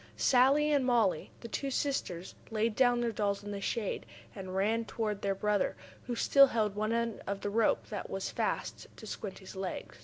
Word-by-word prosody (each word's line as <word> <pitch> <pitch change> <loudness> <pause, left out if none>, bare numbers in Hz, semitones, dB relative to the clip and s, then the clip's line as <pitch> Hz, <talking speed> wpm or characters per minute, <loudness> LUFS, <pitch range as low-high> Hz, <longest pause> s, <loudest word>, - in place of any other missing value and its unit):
Sallie 275 +4 +4
and 285 -2 +3
Mollie, 235 -10 +2
the 235 - -6
two 275 +4 -3
sisters, 250 -11 -2 0.2
laid 220 0 0
down 245 -1 +4
their 235 -1 0
dolls 200 -2 -1
in 205 - -6
the 200 -1 -4
shade, 210 +1 -2 0.3
and 190 -2 -7
ran 210 +4 +2
over 230 - -5
toward 210 -3 -2
their 195 -1 0
brother, 210 0 +1 0.3
who 245 - -2
still 275 +4 +6
held 215 -4 0
one 215 +1 -1
end 230 -1 -1
of 200 0 -3
the 205 - -2
rope, 225 +1 +2
that 205 - -4
was 195 0 -3
fast - - -2
to - - -10
Squinty's 195 -2 -7
leg. 190 -1 -5
215 Hz, 195 wpm, -32 LUFS, 200-240 Hz, 0.3 s, still